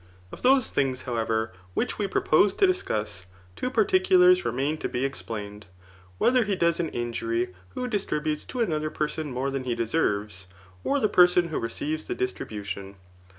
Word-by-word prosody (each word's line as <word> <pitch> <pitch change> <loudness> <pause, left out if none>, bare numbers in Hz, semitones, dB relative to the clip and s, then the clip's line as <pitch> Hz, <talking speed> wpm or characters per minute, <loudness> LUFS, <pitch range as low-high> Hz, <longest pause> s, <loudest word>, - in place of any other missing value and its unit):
Of - - -10
those 260 -1 +4
things, 130 -2 0
however, 110 -2 -1 0.2
which - - -1
we 205 - 0
proposed 190 +1 +3
to 400 - +5
dis 370 -1 +2
cuss, 105 -4 -4 0.3
two 255 - -2
particulars 370 +1 +4
remain 145 +4 -1
to - - -3
be 125 +2 -1
explained; 105 -6 -6 0.5
whether 250 - +4
he 205 -2 -1
does 170 -2 +1
an 165 -2 0
iq*ury 115 -3 -2 0.2
who 250 - -2
distributes 155 -9 -2
to 250 - -4
another 155 -7 0
person 150 -1 -3
more 130 +2 -2
than 135 -1 -3
he 120 -2 -1
cfeserves, 105 - -1 0.4
or 285 - +1
the 215 - +3
person 180 -2 +5
who 160 - -2
receives 150 +7 -3
the - - -3
distri 125 0 -3
bution. 100 -2 -6
150 Hz, 170 wpm, -26 LUFS, -, 0.5 s, to